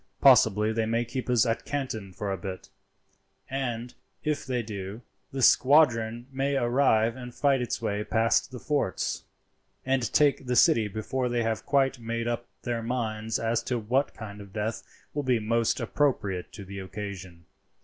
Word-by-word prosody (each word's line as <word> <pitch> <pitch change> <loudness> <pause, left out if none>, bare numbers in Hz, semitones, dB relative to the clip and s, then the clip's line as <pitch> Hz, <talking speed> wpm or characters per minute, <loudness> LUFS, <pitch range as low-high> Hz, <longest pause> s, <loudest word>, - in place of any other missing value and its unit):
Possibly 110 -5 +5
they 110 0 0
may 115 +1 +1
keep 125 +2 -5
us 125 -1 +4
at 115 -1 -1
Canton 120 -9 -4
for 100 +2 -4
a - - 0
bit, 95 +1 -7 0.8
and, 125 -3 -3 0.3
if 150 -4 -1
they 125 -2 -1
do, 105 +1 -6 0.3
the 135 -1 -2
squadron 120 -5 +4
may 135 +1 0
arrive 120 -3 +3
and 125 -1 -9
fight 140 -3 +2
its 120 - -3
way 105 +1 -1
past 115 +1 +2
the 125 - -8
forts, 145 -10 -1 0.6
and 130 -3 +1
take 140 -3 +3
the 125 - +1
city 115 -2 +5
before 115 +5 -2
they 120 -1 0
have 110 -1 -2
quite 135 -2 +2
made 115 0 -3
up 120 0 -2 0.2
their 120 -1 -2
minds 115 -2 -2
as 115 0 0
to 125 - -2
what 125 +6 0
kind 105 -2 -8
of 100 -1 -12
death 110 +1 -2 0.3
will 145 - -1
be 130 -3 +2
most 115 +1 +1
appropriate 115 -7 0
to 100 - -8
the 100 +1 -7
occasion. 95 -3 -7
115 Hz, 170 wpm, -27 LUFS, 110-130 Hz, 0.8 s, Possibly